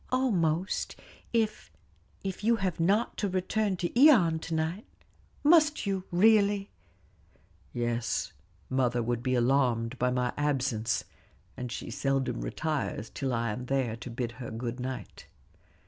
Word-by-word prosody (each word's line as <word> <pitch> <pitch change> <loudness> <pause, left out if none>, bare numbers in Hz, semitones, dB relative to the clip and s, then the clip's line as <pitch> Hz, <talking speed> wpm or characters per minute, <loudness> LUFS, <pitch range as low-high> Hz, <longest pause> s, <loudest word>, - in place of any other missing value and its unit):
"Almost 190 -9 0 0.4
if 220 -2 -1 0.5
if 195 0 -4
you 230 +2 +4
have 190 -6 -2
not 200 +7 +2
to 205 - 0
return 190 +2 0
to 240 - +5
Ion 170 - +4
to 165 0 -4
night. 160 +6 -2 0.6
Must 305 -2 +5
you, 195 -2 -1
really?" 200 +1 +4 1.0
"Yes; 120 -1 -1 0.3
mother 125 -2 +1
would 120 0 -1
be 130 0 0
alarmed 125 -1 +1
by 125 - +2
my 125 -1 0
absence; 130 -6 0 0.5
and 125 -1 -5
she 115 - -5
seldom 135 - -1
retires 115 - -3
till 135 -2 -2
I 115 -2 0
am 125 +4 -5
there 130 -4 0
to 120 - -8
bid 120 -1 -3
her 120 - -5
good 115 +2 -4
night." 130 +1 -6
140 Hz, 135 wpm, -29 LUFS, 120-195 Hz, 1.0 s, to